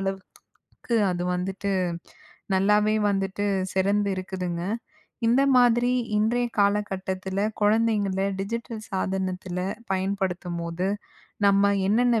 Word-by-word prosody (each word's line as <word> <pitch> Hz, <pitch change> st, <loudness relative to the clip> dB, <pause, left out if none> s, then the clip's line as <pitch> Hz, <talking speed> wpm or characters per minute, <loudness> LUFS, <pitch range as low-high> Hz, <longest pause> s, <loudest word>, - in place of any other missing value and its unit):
அளவுக்கு 195 Hz, +4 st, -6 dB
அது 175 Hz, 0 st, -2 dB
வந்துட்டு 195 Hz, +2 st, -2 dB, 0.8 s
நல்லாவே 210 Hz, +3 st, +3 dB
வந்துட்டு 195 Hz, 0 st, -1 dB, 0.3 s
சிறந்து 200 Hz, +2 st, +2 dB
இருக்குதுங்க. 180 Hz, -2 st, -4 dB, 0.7 s
இந்த 255 Hz, +4 st, +4 dB
மாதிரி 245 Hz, 0 st, +4 dB, 0.3 s
இன்றைய 240 Hz, +3 st, +2 dB
காலகட்டத்தில, 190 Hz, -2 st, -1 dB, 0.3 s
குழந்தைங்களை 205 Hz, -3 st, +2 dB
டிஜிட்டல் 230 Hz, +2 st, -4 dB
சாதனத்தில 185 Hz, -1 st, -2 dB, 0.3 s
பயன்படுத்தும்போது, 185 Hz, -2 st, -2 dB, 0.6 s
நம்ம 200 Hz, 0 st, +4 dB, 0.2 s
என்னென்ன 235 Hz, +1 st, +3 dB
195 Hz, 85 wpm, -25 LUFS, 190-215 Hz, 0.8 s, இந்த